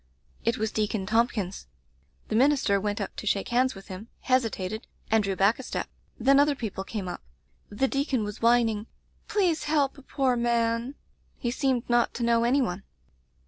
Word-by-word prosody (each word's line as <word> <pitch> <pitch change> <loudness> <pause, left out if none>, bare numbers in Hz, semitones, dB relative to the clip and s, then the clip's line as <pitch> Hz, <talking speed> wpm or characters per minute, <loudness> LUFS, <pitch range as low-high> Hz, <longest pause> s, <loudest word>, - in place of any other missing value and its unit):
"It 230 0 +1
was 220 0 -1
Deacon 210 -2 -1
Thompkins. 210 - 0 0.6
The 215 - -1
min 265 +6 +5
ister 200 -8 +1
went 205 +1 -2
up 200 - -4
to 215 - -5
shake 200 0 0
hands 255 +1 +2
with 195 - -12
him, 190 +4 -8
hesitated, 220 -5 -1 0.2
and 220 -1 +4
drew 195 -1 -1
back 200 +6 +3
a - - -3
step. 255 - -4 0.3
Then 275 +4 +5
other 290 0 +4
people 215 -6 -4
came 195 -1 -5
up. 175 - -5 0.5
The 240 +6 0
deacon 275 -4 0
was 210 0 -6
whining 230 -2 +3 0.2
— - - -38
'Please 355 -7 +1
help 295 -2 +1
a - - -13
poor 265 -1 0
man!* 235 +2 0 0.4
He 240 - -2
seemed 260 -2 0
not 240 0 +2
to 240 - -2
know 235 0 +3
any 265 +3 +3
one. 185 -4 -3
230 Hz, 185 wpm, -27 LUFS, 210-260 Hz, 0.6 s, min